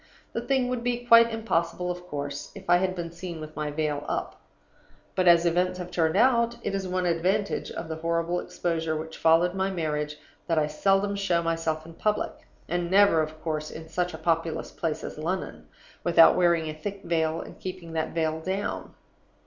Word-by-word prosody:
The 230 Hz, -, -2 dB
thing 260 Hz, +1 st, +1 dB
would 250 Hz, -1 st, -2 dB
be 245 Hz, 0 st, -1 dB
quite 230 Hz, -1 st, +7 dB
impossible, 180 Hz, -5 st, -1 dB
of 180 Hz, 0 st, -8 dB
course, 145 Hz, -2 st, -5 dB
if 195 Hz, -1 st, -11 dB
I 175 Hz, 0 st, +6 dB
had 185 Hz, 0 st, 0 dB
been 170 Hz, -2 st, -5 dB
seen 170 Hz, -1 st, -7 dB
with 155 Hz, 0 st, -9 dB
my 150 Hz, -1 st, -2 dB
veil 150 Hz, -1 st, -1 dB
up; -, -, -3 dB, 0.7 s
but, 185 Hz, -1 st, +1 dB
as 170 Hz, 0 st, +7 dB
events 180 Hz, +2 st, +1 dB
have 180 Hz, -1 st, -6 dB
turned 160 Hz, -2 st, +1 dB
out, 235 Hz, -2 st, +4 dB
it 200 Hz, -, -2 dB
is 195 Hz, -1 st, -2 dB
one 185 Hz, 0 st, -1 dB
advantage 185 Hz, +5 st, 0 dB
of 165 Hz, -, -6 dB
the 160 Hz, 0 st, -4 dB
horrible 170 Hz, +2 st, 0 dB
exposure 165 Hz, -3 st, -2 dB
which 160 Hz, +1 st, -7 dB
followed 165 Hz, +2 st, +4 dB
my 190 Hz, 0 st, 0 dB
marriage 150 Hz, -4 st, -2 dB, 0.3 s
that 165 Hz, -2 st, +1 dB
I 155 Hz, -, +4 dB
seldom 195 Hz, +6 st, +1 dB
show 180 Hz, -4 st, +1 dB
myself 165 Hz, -1 st, -1 dB
in 165 Hz, -, -11 dB
public, 210 Hz, +5 st, 0 dB, 0.4 s
and 175 Hz, 0 st, -1 dB
never, 195 Hz, -4 st, +5 dB
of 155 Hz, 0 st, -5 dB
course, 155 Hz, -2 st, -2 dB
in 160 Hz, 0 st, -9 dB
such 180 Hz, +1 st, -1 dB
a -, -, -7 dB
populous 165 Hz, -1 st, -1 dB
place 160 Hz, -2 st, -3 dB
as -, -, -6 dB
London, 180 Hz, +4 st, -4 dB, 0.4 s
without 165 Hz, -1 st, +7 dB
wearing 170 Hz, -3 st, +3 dB
a 155 Hz, -, -3 dB
thick 195 Hz, +6 st, -6 dB
veil 160 Hz, -1 st, 0 dB
and -, -, -9 dB
keeping 180 Hz, -3 st, -7 dB
that 160 Hz, -1 st, -1 dB
veil 160 Hz, -1 st, 0 dB
down. 190 Hz, +4 st, -3 dB
170 Hz, 195 wpm, -27 LUFS, 160-190 Hz, 0.7 s, quite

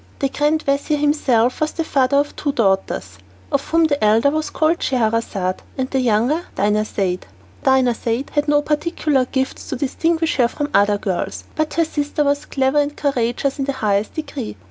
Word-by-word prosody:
The 275 Hz, -, 0 dB
grand 300 Hz, +3 st, +1 dB
vizir 280 Hz, +2 st, +1 dB
himself 270 Hz, -5 st, +2 dB
was 310 Hz, -, 0 dB
the 330 Hz, -, -2 dB
father 275 Hz, -3 st, +2 dB
of 290 Hz, +1 st, 0 dB
two 285 Hz, -2 st, -2 dB
daughters, 190 Hz, -, 0 dB, 0.3 s
of 280 Hz, 0 st, 0 dB
whom 330 Hz, 0 st, +3 dB
the 290 Hz, -6 st, +1 dB
elder 225 Hz, +6 st, +4 dB
was 310 Hz, +1 st, -2 dB
called 320 Hz, +2 st, +1 dB
Scheherazade, 220 Hz, -6 st, 0 dB, 0.2 s
and 260 Hz, -1 st, -2 dB
the 265 Hz, -, +1 dB
younger 245 Hz, +6 st, +2 dB
Dinarzade. 200 Hz, -, 0 dB, 0.4 s
Dinarzade 250 Hz, -1 st, +1 dB
had 295 Hz, 0 st, 0 dB
no 295 Hz, 0 st, +3 dB
particular 300 Hz, -3 st, 0 dB
gifts 265 Hz, +1 st, -3 dB
to -, -, -2 dB
distinguish 320 Hz, +5 st, 0 dB
her 245 Hz, -3 st, +4 dB
from 290 Hz, +4 st, -4 dB
other 205 Hz, +1 st, +4 dB
girls, 190 Hz, -3 st, -3 dB
but 310 Hz, 0 st, -1 dB
her 330 Hz, 0 st, +3 dB
sister 295 Hz, -1 st, -1 dB
was 285 Hz, 0 st, 0 dB
clever 270 Hz, +1 st, +1 dB
and 290 Hz, 0 st, -1 dB
courageous 270 Hz, 0 st, -1 dB
in 270 Hz, -, 0 dB
the 275 Hz, -, -1 dB
highest 210 Hz, -4 st, -1 dB
degree. 280 Hz, -, -5 dB
270 Hz, 175 wpm, -20 LUFS, 230-295 Hz, 0.4 s, elder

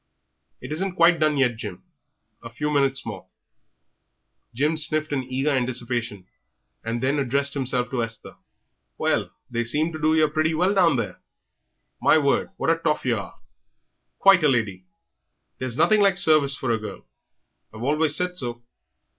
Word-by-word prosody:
"It 125 Hz, -, -8 dB
isn't 180 Hz, +4 st, -2 dB
quite 170 Hz, -1 st, +4 dB
done 155 Hz, -1 st, +2 dB
yet, 125 Hz, -4 st, +1 dB
Jim; 105 Hz, -5 st, -8 dB, 0.6 s
a 115 Hz, -, -9 dB
few 150 Hz, +6 st, -3 dB
minutes 135 Hz, -2 st, +1 dB
more 100 Hz, -5 st, -7 dB, 0.6 s
" -, -, -51 dB
Jim 150 Hz, +6 st, +1 dB
sniffed 155 Hz, -1 st, 0 dB
in 135 Hz, -2 st, -1 dB
eager 130 Hz, +3 st, -1 dB
anticipation, 120 Hz, -6 st, -2 dB, 0.6 s
and 115 Hz, +2 st, -3 dB
then 140 Hz, +3 st, +1 dB
addressed 140 Hz, +1 st, +1 dB
himself 125 Hz, -3 st, -1 dB
to 125 Hz, -3 st, -1 dB
Esther. 115 Hz, -1 st, -7 dB, 0.6 s
"Well, -, -, 0 dB, 0.2 s
they 120 Hz, 0 st, -1 dB
seem 150 Hz, +8 st, 0 dB
to 155 Hz, -, -7 dB
do 155 Hz, +1 st, +3 dB
yer 155 Hz, -1 st, +4 dB
pretty 155 Hz, +1 st, 0 dB
well 180 Hz, +5 st, +2 dB
down 180 Hz, -6 st, +3 dB
there. 105 Hz, -7 st, -4 dB, 0.8 s
My -, -, +5 dB
word, 140 Hz, -3 st, +1 dB
what -, -, +1 dB
a 165 Hz, -, +1 dB
toff 150 Hz, -4 st, -1 dB
yer 120 Hz, -3 st, +1 dB
are! 100 Hz, -, -9 dB, 0.8 s
Quite 195 Hz, -4 st, +5 dB
a -, -, +5 dB
lady.... 105 Hz, -8 st, -1 dB, 0.7 s
There's 130 Hz, -1 st, -4 dB
nothing 215 Hz, +6 st, +4 dB
like 195 Hz, -2 st, +3 dB
service 150 Hz, -4 st, +4 dB
for 130 Hz, -3 st, -2 dB
a 115 Hz, -, 0 dB
girl; 105 Hz, -, -9 dB, 0.7 s
I've 110 Hz, +2 st, -9 dB
always 150 Hz, +2 st, +1 dB
said 180 Hz, +2 st, 0 dB
so. 120 Hz, -6 st, -4 dB
140 Hz, 165 wpm, -23 LUFS, 120-155 Hz, 0.8 s, My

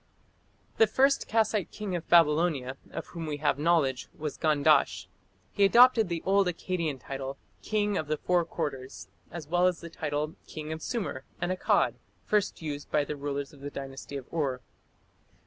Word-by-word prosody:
The 225 Hz, -, +6 dB
first 275 Hz, +6 st, +3 dB
Kassite 215 Hz, -4 st, +1 dB
king 205 Hz, -4 st, -4 dB
of 170 Hz, -, -5 dB
Babylonia 150 Hz, -5 st, +4 dB
of -, -, -6 dB
whom 165 Hz, -2 st, -6 dB
we 150 Hz, -1 st, -3 dB
have 145 Hz, -1 st, +1 dB
knowledge 150 Hz, -5 st, +2 dB
was 150 Hz, -1 st, -4 dB
Gandash. 150 Hz, -2 st, +3 dB, 0.5 s
He 200 Hz, -, +1 dB
adopted 235 Hz, 0 st, +6 dB
the 170 Hz, -1 st, -3 dB
old 195 Hz, 0 st, +3 dB
Akkadian 170 Hz, -5 st, -2 dB
title, 135 Hz, 0 st, -6 dB, 0.2 s
"king 210 Hz, -2 st, 0 dB
of 155 Hz, -, -4 dB
the 155 Hz, 0 st, 0 dB
four 175 Hz, +1 st, +2 dB
quarters", 145 Hz, -5 st, -5 dB, 0.2 s
as 165 Hz, -4 st, -7 dB
well 175 Hz, +3 st, +3 dB
as 180 Hz, -2 st, 0 dB
the 170 Hz, -1 st, -9 dB
title 150 Hz, 0 st, -2 dB
"king 155 Hz, 0 st, -6 dB
of 160 Hz, -, -7 dB
Sumer 155 Hz, -, -3 dB, 0.2 s
and 175 Hz, +1 st, -1 dB
Akkad", 185 Hz, -, +1 dB, 0.3 s
first 210 Hz, -5 st, 0 dB
used 145 Hz, -2 st, -5 dB
by 150 Hz, -1 st, +2 dB
the 150 Hz, -, -4 dB
rulers 140 Hz, 0 st, -4 dB
of 145 Hz, -, -15 dB
the 145 Hz, -, -5 dB
Dynasty 135 Hz, 0 st, -7 dB
of 135 Hz, -, -8 dB
Ur. 135 Hz, -6 st, -1 dB
160 Hz, 170 wpm, -29 LUFS, 145-180 Hz, 0.5 s, The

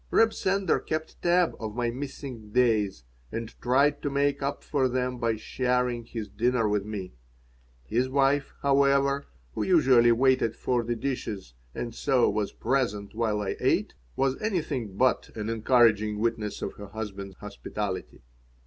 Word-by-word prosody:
Reb 225 Hz, 0 st, +4 dB
Sender 190 Hz, -2 st, +1 dB
kept 155 Hz, 0 st, -4 dB
tab 175 Hz, 0 st, +3 dB
of 110 Hz, -2 st, -5 dB
my 120 Hz, -1 st, 0 dB
missing 130 Hz, -4 st, -7 dB
"days" 110 Hz, -, +2 dB, 0.3 s
and 115 Hz, -1 st, -5 dB
tried 140 Hz, +4 st, +3 dB
to 145 Hz, -, -1 dB
make 140 Hz, 0 st, +1 dB
up 140 Hz, +1 st, -2 dB
for 135 Hz, -3 st, +1 dB
them 125 Hz, 0 st, -1 dB
by 115 Hz, -1 st, +1 dB
sharing 125 Hz, +1 st, -1 dB
his 115 Hz, -2 st, -5 dB
dinner 115 Hz, +3 st, +1 dB
with 105 Hz, -1 st, +1 dB
me. 100 Hz, -, -6 dB, 0.7 s
His 120 Hz, -, 0 dB
wife, 140 Hz, +1 st, +2 dB
however, 140 Hz, 0 st, +3 dB, 0.3 s
who -, -, -3 dB
usually 130 Hz, -9 st, +5 dB
waited 130 Hz, -1 st, +3 dB
for 125 Hz, -2 st, 0 dB
the 120 Hz, +1 st, -2 dB
dishes 110 Hz, -, -4 dB, 0.2 s
and 120 Hz, -1 st, -4 dB
so 130 Hz, 0 st, +2 dB
was 105 Hz, 0 st, -1 dB
present 105 Hz, -7 st, -1 dB
while 110 Hz, -2 st, 0 dB
I 100 Hz, -, -2 dB
ate, -, -, +1 dB, 0.2 s
was 135 Hz, -1 st, 0 dB
anything 150 Hz, -, -2 dB
but 130 Hz, +1 st, +2 dB
an 110 Hz, 0 st, -3 dB
encouraging 110 Hz, -2 st, +3 dB
witness 110 Hz, -1 st, -2 dB
of -, -, -3 dB
her 105 Hz, -, -8 dB
husband's 100 Hz, -2 st, -6 dB
hospitality. 105 Hz, -1 st, -5 dB
120 Hz, 150 wpm, -27 LUFS, 110-135 Hz, 0.7 s, usually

